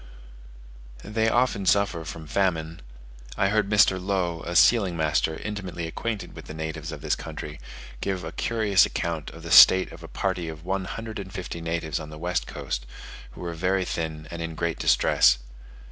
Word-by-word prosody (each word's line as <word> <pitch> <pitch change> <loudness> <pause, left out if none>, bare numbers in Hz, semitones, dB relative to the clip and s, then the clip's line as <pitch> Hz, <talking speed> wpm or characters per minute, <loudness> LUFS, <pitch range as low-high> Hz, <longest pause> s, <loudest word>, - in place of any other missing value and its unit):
They 110 +2 0
often 120 -5 +1
suffer 100 -5 +2
from 80 +1 -7
famine: 80 -1 -1 0.6
I 100 -1 +2
heard 105 -1 +1
Mr. 100 -3 +4
Low, 90 -4 -1
a 85 - -5
sealing 95 -2 +5
master 80 0 +1
intimately 95 -5 -5
acquainted 105 +6 -4
with - - -10
the 80 - -8
natives 80 0 -5
of 75 -2 -8
this 75 0 0
country, 75 0 -7 0.4
give 95 -3 -2
a 80 - -5
curious 110 -1 +2
account 85 -4 -2
of - - -12
the - - -6
state 95 0 +8
of - - -11
a - - -9
party 95 -4 -2
of 80 +1 -9
one 95 0 -1
hundred 110 +2 -6
and 95 -1 -7
fifty 90 -3 -6
natives 80 -2 -2
on 75 -1 -8
the 75 - -9
west 90 +2 -2
coast, - - -5 0.5
who - - -11
were 85 -1 -4
very 95 +3 0
thin 80 -2 -4
and 85 0 -5
in 80 -1 -4
great 85 0 -2
distress. - - +4
85 Hz, 180 wpm, -25 LUFS, 80-100 Hz, 0.6 s, state